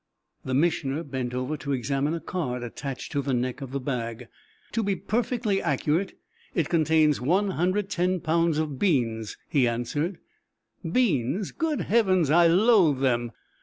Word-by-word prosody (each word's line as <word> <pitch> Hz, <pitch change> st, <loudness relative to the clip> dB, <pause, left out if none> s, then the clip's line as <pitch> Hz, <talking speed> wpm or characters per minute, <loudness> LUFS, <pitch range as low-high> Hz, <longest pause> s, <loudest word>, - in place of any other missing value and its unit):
The 130 Hz, -, -2 dB
Missioner 150 Hz, -1 st, +1 dB
bent 130 Hz, -4 st, -4 dB
over 130 Hz, +4 st, -2 dB
to 140 Hz, 0 st, -3 dB
examine 140 Hz, +4 st, -1 dB
a -, -, -3 dB
card 125 Hz, -10 st, -3 dB
attached 130 Hz, +2 st, -6 dB
to 145 Hz, -, 0 dB
the 135 Hz, -2 st, -1 dB
neck 125 Hz, +3 st, -2 dB
of 135 Hz, -, -6 dB
the 140 Hz, +1 st, -3 dB
bag. 120 Hz, -3 st, -4 dB, 0.4 s
"To 230 Hz, -, 0 dB
be 200 Hz, -2 st, 0 dB
perfectly 220 Hz, 0 st, -1 dB
accurate 170 Hz, +6 st, 0 dB, 0.4 s
it 165 Hz, -5 st, 0 dB
contains 155 Hz, -3 st, +3 dB
110 185 Hz, +2 st, +1 dB
pounds 165 Hz, 0 st, +1 dB
of 150 Hz, -4 st, -2 dB
beans," 115 Hz, -, 0 dB
he 130 Hz, -4 st, +2 dB
answered. 135 Hz, +10 st, -2 dB, 0.7 s
"Beans! 180 Hz, -, +1 dB
Great 320 Hz, -3 st, -1 dB
Heavens! 185 Hz, -9 st, +2 dB
I 170 Hz, +1 st, +6 dB
loathe 180 Hz, -, +4 dB
them!" 120 Hz, -3 st, +1 dB
155 Hz, 145 wpm, -26 LUFS, 130-185 Hz, 0.7 s, I